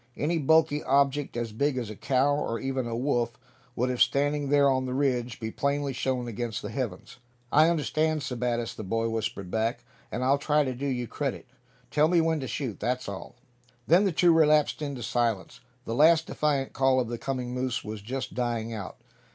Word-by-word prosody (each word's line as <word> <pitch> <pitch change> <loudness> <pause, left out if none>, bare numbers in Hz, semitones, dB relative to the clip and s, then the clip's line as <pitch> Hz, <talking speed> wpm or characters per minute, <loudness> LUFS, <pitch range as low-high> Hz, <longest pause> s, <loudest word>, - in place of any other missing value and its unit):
Any 165 +3 0
bulky 155 0 +3
object 140 -1 +1
as 120 -2 -3
big 140 +5 0
as 115 -4 -3
a - - -7
cow, 135 +6 +2
or 115 -6 -2
even 135 -2 -2
a 115 - -3
wolf, 120 -2 0 0.4
would, 125 +2 0
if 125 - -3
standing 145 0 +2
there 145 0 +5
on 130 -1 +1
the 125 - -3
ridge, 125 -4 0
be 110 -1 -4
plainly 140 +1 -1
shown 125 -1 -1
against 115 -1 -4
the - - -5
heavens. 125 -1 -5 0.3
"I 155 +2 +6
understand, 155 -1 0
Sebattis," 120 -3 -2
the - - -7
boy 115 +3 -1
whispered 105 -4 -3
back; 110 +1 -1 0.3
"and 120 +4 -2
I'll 135 +2 +3
try 150 +1 +2
to 130 -2 -2
do 135 +3 -4
you 125 -3 -1
credit. - - -4 0.5
Tell 150 +1 +4
me 175 +1 +3
when 160 -1 +1
to 130 - -4
shoot, 120 -2 -4
that's 125 +3 -2
all." 100 +3 -7 0.5
Then 175 +5 +5
the 195 - +2
two 170 +1 +4
relapsed 155 -2 +3
into 140 -5 -4
silence. 115 -5 -1 0.3
The 115 - -3
last 160 +5 +5
defiant 145 -3 -1
call 135 -1 +3
of 125 - 0
the 120 0 -5
coming 125 -2 -3
moose 125 -1 -2
was 105 0 -6
just 130 +6 -5
dying 115 -2 -2
out. 105 -4 -6
130 Hz, 200 wpm, -27 LUFS, 120-145 Hz, 0.5 s, I